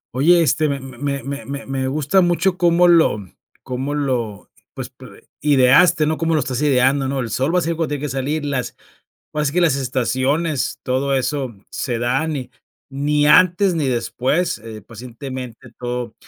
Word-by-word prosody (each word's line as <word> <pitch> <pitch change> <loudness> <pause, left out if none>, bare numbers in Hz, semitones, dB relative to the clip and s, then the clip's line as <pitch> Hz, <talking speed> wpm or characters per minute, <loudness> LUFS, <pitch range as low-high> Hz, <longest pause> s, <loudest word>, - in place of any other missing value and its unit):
Oye, 170 +5 +5
este, 155 +1 +1
me 140 -1 -2
me 135 +1 -5
me 140 +1 -5
me 140 0 -6
me 135 -1 -2
gusta 155 +7 +2
mucho 175 +1 +2
cómo 175 -1 +4
lo 165 -10 +5 0.5
cómo 135 +3 -3
lo, 120 -8 -3 0.2
pues, - - -6
p - - -14 0.3
ideaste, 150 +4 +5
¿no?, 155 +1 0
cómo 165 -1 0
lo - - +3
estás 130 +1 -3
ideando, 135 -1 +2
¿no?, 135 0 -2
el 115 -3 -3
sol 135 +8 0
va 180 - +2
a - - +3
salir 165 0 -2
cuando 165 - 0
tiene 145 - -3
que 145 - -2
salir, 140 +4 -2
las, 135 -3 -3 0.6
ahora 150 0 -1
sí 140 - -1
que 180 - +2
las 160 -5 +3
estaciones, 130 +4 -1
todo 135 +2 0
eso 130 -2 -2 0.2
se 120 -2 -2
dan 135 +6 0
y 130 -3 -5 0.4
ni 145 +2 0
antes 185 +3 +5
ni 150 -4 0
después, 130 +7 0
eh, 110 -1 -9
pacientemente 125 +1 -9
todo 120 -2 -4
140 Hz, 180 wpm, -20 LUFS, 130-155 Hz, 0.6 s, Oye